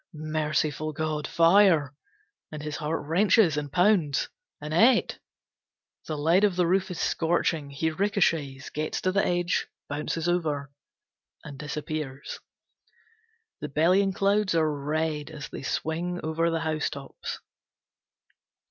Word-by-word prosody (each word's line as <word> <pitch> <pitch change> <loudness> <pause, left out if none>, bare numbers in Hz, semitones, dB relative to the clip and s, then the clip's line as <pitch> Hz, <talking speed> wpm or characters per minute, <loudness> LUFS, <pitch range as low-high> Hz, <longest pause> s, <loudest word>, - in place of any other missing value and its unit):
Merciful 155 0 -1
God! 155 0 -2
Fire! 165 -5 +4 0.6
And 150 -1 -7
his 150 -1 -4
heart 155 -1 -3
wrenches 180 +1 +4
and 145 -2 -3
pounds 180 -6 +2 0.3
"Annette!" 175 - +3 0.9
The 155 - -3
lead 165 +7 +3
of 200 -3 +3
the 180 -1 +2
roof 190 +3 +1
is 180 - -5
scorching, 165 -3 0
he 150 +3 -1
ricochets, 160 -7 0
gets 155 +1 -2
to 185 - +1
the 195 +1 +2
edge, 175 0 0 0.2
bounces 150 +3 -3
over 150 -6 -1 0.7
and 140 -3 -9
disappears. 150 -2 -5 1.2
The 150 - -5
bellying 180 +7 +3
clouds 200 -1 +1
are 155 -2 +2
red 150 +1 -2
as 155 -2 -8
they - - -7
swing 170 +5 -2
over 160 +2 0
the 165 -1 -1
housetops. 155 -3 -4
160 Hz, 120 wpm, -27 LUFS, 150-175 Hz, 1.2 s, Fire